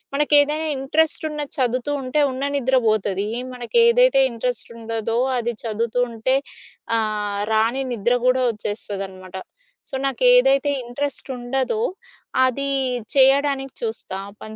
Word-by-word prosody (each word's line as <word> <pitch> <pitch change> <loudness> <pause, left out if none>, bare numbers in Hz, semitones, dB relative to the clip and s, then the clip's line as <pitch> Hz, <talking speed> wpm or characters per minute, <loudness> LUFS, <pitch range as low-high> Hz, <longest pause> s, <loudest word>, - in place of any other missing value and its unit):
మనకేదైనా 295 +2 +3
ఇంట్రెస్ట్ 305 +4 0
ఉన్నది 295 -2 -5
చదువుతూ 255 +3 0
ఉంటే, 265 +3 0
ఉన్న 265 +2 -4
నిద్ర 260 0 +2
బోతది. 205 -1 0 0.3
మనకేదైతే 470 - +4
ఇంట్రెస్ట్ 235 0 -4
ఉండదో 225 0 -3 0.2
అది 240 0 -2
చదువుతూ 230 +2 -1
ఉంటే 230 +4 0 0.6
ఆహ్, 210 -2 -2
రాని 230 +5 +2
నిద్ర 235 +2 +1
గూడా 255 0 +3
వచ్చేస్తదనమాట. 195 -3 -6 0.5
సో, 270 - -5
నాకేదైతే 290 - +4
ఇంట్రెస్ట్ 275 +4 -4
ఉండదో 265 - -1 0.6
అది 275 +2 -1 0.5
చేయడానికి 270 0 +3
చూస్తా. 220 -4 -4
ఆ - - -13
పని 220 0 -9
255 Hz, 115 wpm, -22 LUFS, 220-280 Hz, 0.6 s, మనకేదైతే